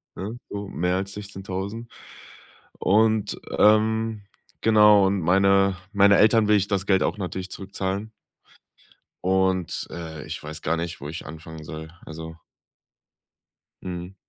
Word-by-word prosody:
ne? 105 +5 -5
Um 100 -1 -6
mehr 90 +3 +1
als 95 +1 -4
16.000. 100 +3 -6 0.9
Und, 110 +1 +2 0.2
ähm, 110 0 +3 0.4
genau, 105 -2 +6
und 95 -1 0
meine 95 +2 +3 0.2
meine 100 0 +6
Eltern 110 0 +5
will 105 - +5
ich 100 0 0
das 100 -1 -1
Geld 95 -2 +3
auch - - -1
natürlich 95 0 -5
zurückzahlen. 100 +2 -4 1.1
Und, 95 -1 0
äh, 80 -3 -7
ich - - -6
weiß 75 +1 -7
gar 85 +2 0
nicht, 85 0 -5
wo 75 - -6
ich 85 - -7
anfangen 80 +1 -9
soll. 80 0 -8 0.2
Also. 80 +1 -8 1.5
Mhm. 90 +1 -6
95 Hz, 130 wpm, -24 LUFS, 85-105 Hz, 1.5 s, genau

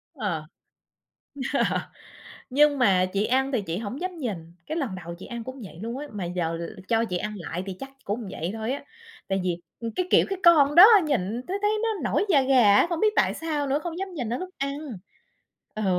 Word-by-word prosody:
Ờ. 200 - -2 1.1
Ờ. - - +2 0.7
Nhưng 290 +2 +4
mà 190 -7 +4
chị 200 +1 +1
ăn 265 +3 +1
thì 245 - +1
chị 170 -3 -4
hổng 225 - -5
dám 365 -2 -4
nhìn. 230 - -3 0.3
Cái 315 - -3
lần 260 - -2
đầu 170 -2 -7
chị - - -9
ăn 235 -1 -6
cũng 260 +2 -8
vậy 170 -4 -11
luôn 230 +3 -4
á, 295 +2 -6
mà 200 -4 -4
giờ 170 -2 -2 0.3
cho 230 0 +2
chị 180 -5 -2
ăn 210 +4 -4
lại 180 0 -5
thì 190 - -3
chắc 270 - -7
cũng 210 +1 -3
vậy 170 +4 -4
thôi 225 +2 -3
á. 280 - -4 0.4
Tại 195 0 0
vì, 180 -2 -1 0.2
ừm, 230 -1 -4
cái 365 -1 -1
kiểu - - +5
cái 390 -2 -3
con 295 -5 +6
đó 350 - +11 0.2
nhìn 235 -5 -1
thấy 380 +2 -1
thấy 415 0 +2
nó 460 - +1 0.2
nổi - - +2
da 285 -7 +5
gà 250 -6 +5
á, - - +6
không 340 -2 -1
biết 430 0 +3
tại - - +3
sao 300 -3 -2
nữa. 275 +2 +1
Không 345 -1 -4
dám 385 0 -5
nhìn 250 -8 -3
nó 240 - -1
lúc 370 0 -6
ăn. 275 +1 -2 1.0
Ừ. 215 -1 -3
245 Hz, 225 wpm, -25 LUFS, 200-295 Hz, 1.1 s, đó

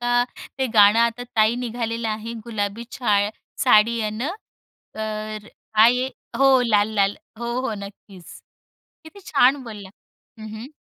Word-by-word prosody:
का 245 0 +2 0.3
ते 265 - +1
गाणं 210 +1 +7
आता 235 +1 +1
ताई 220 +1 +4
निघालेलं 230 -1 -3
आहे. 220 +1 -4
गुलाबी 220 0 -3
छाया 205 -4 +1 0.3
साडी 230 -2 +4
आहे 215 -1 -1
ना, 235 +8 -3 0.6
तर 215 -1 -5 0.3
कायआहे? 240 +4 +5 0.3
हो, 270 -1 +5
लाल, 210 -2 +3
लाल, 200 -1 +2 0.2
हो, 235 0 -3
हो, 260 - -2
नक्कीच. 200 -3 -12 0.6
किती 360 +6 -13
छान 275 -1 +3
बोलला 210 -5 -9 0.5
हं, 215 - -7
हं. 250 +7 -9
225 Hz, 140 wpm, -22 LUFS, 210-245 Hz, 0.6 s, गाणं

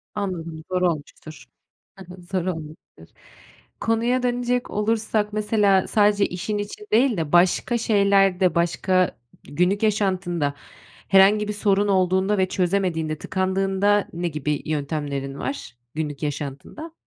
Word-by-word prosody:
Anladım. 170 -6 -4
Zor 180 0 0
olmuştur. 155 -4 -4 0.5
Hı 190 - -10
hı. 180 - -13
Zor 180 0 -3
olmuştur. 160 -3 -7 0.7
Konuya 235 +3 +1
dönecek 245 0 -1
olursak, 215 0 0
mesela, 210 -3 +2
sadece 205 -1 +3
işin 195 +4 -3
için 205 0 -7
değil 240 +1 +3
de 160 -3 -3
başka 180 +7 +3
şeylerde, 195 -5 +3
başka 180 +1 +1 0.3
günlük 180 - 0
yaşantında 185 -8 0 0.5
herhangi 200 +2 +5
bir - - -1
sorun 205 -1 +1
olduğunda 190 +1 +2
ve 185 -1 +2
çözemediğinde, 175 -5 -1
tıkandığında 195 +2 0
ne 175 +1 -2
gibi 150 -2 -3
yöntemlerin 145 -2 -3
var 270 - -5 0.2
günlük 150 -2 -4
yaşantında? 145 - -5
190 Hz, 120 wpm, -23 LUFS, 165-210 Hz, 0.7 s, herhangi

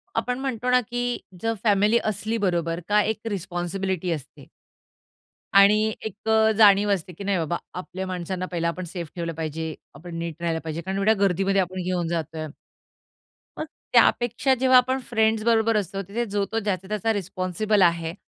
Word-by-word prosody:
आपण 250 +1 -1
म्हणतो 250 -3 -2
ना, 250 0 +5
की 245 +1 -3 0.2
जर 225 0 0
फॅमिली 210 +1 +4
असली 215 +2 -1
बरोबर, 170 -4 0
का 210 0 +5
एक 220 0 -2
रिस्पॉन्सिबिलिटी 185 -1 -2
असते. 150 -5 -7 1.1
आणि 215 +2 +5
एक 220 +1 -6 0.3
जाणीव 205 -1 +6
असते, 180 -2 -2
की 200 +5 -9
नाही 195 -1 +1
बाबा 170 +1 -1 0.2
आपल्या 190 +1 -6
माणसांना 185 0 -3
पहिला 170 -1 -1
आपण 180 +2 -3
सेफ 170 -2 -6
ठेवलं 170 -1 -3
पाहिजे, 160 0 -4 0.2
आपण 175 0 -9
नीट 165 -1 -4
राहायला 165 -1 0
पाहिजे. 160 +1 -4
कारण 190 +2 -4
एवढ्या 205 +3 +4
गर्दीमध्ये 195 0 +2
आपण 185 +1 -3
घेऊन 180 -2 -1
जातोय. 160 -1 -3 1.1
मग 310 - -2 0.3
त्यापेक्षा 240 +3 +4
जेव्हा 260 -1 +6
आपण 260 +1 +3
फ्रेंड्स 220 -1 +2
बरोबर 225 -1 +3
असतो, 195 0 -2
तिथे 235 +4 -2
जो-तो 205 +1 -1
ज्याचा-त्याचा 205 +2 -1
रिस्पॉन्सिबल 195 +1 -1
आहे. 170 -2 +2
195 Hz, 160 wpm, -24 LUFS, 175-220 Hz, 1.1 s, जाणीव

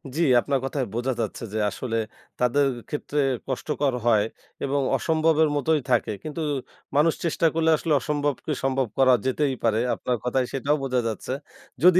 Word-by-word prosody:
জি, 165 - 0 0.2
আপনার 140 +1 0
কথায় 135 -1 -1
বোঝা 120 +3 0
যাচ্ছে 110 +1 -4
যে 110 - -1
আসলে 115 +3 -3 0.4
তাদের 130 +3 +3 0.2
ক্ষেত্রে 150 0 -2 0.3
কষ্টকর 140 +1 -1
হয় 110 -3 +4 0.4
এবং 140 +1 0 0.2
অসম্ভবের 160 -1 +2
মতোই 150 +1 +2
থাকে। - - +2
কিন্তু 155 +1 -5 0.5
মানুষ 155 +3 +4
চেষ্টা 165 0 +2
করলে 160 0 +2
আসলে 160 0 0
অসম্ভবকে 145 +2 -2
সম্ভব 135 -1 +1
করা 130 -1 +6
যেতেই 135 +1 +1
পারে। 110 -1 +2 0.2
আপনার 125 -1 -1
কথায় 125 +1 +1
সেটাও 140 +2 +1
বোঝা 130 -2 +1
যাচ্ছে। 115 +3 -3 0.5
যদি 180 0 +7
140 Hz, 155 wpm, -25 LUFS, 125-150 Hz, 0.5 s, যদি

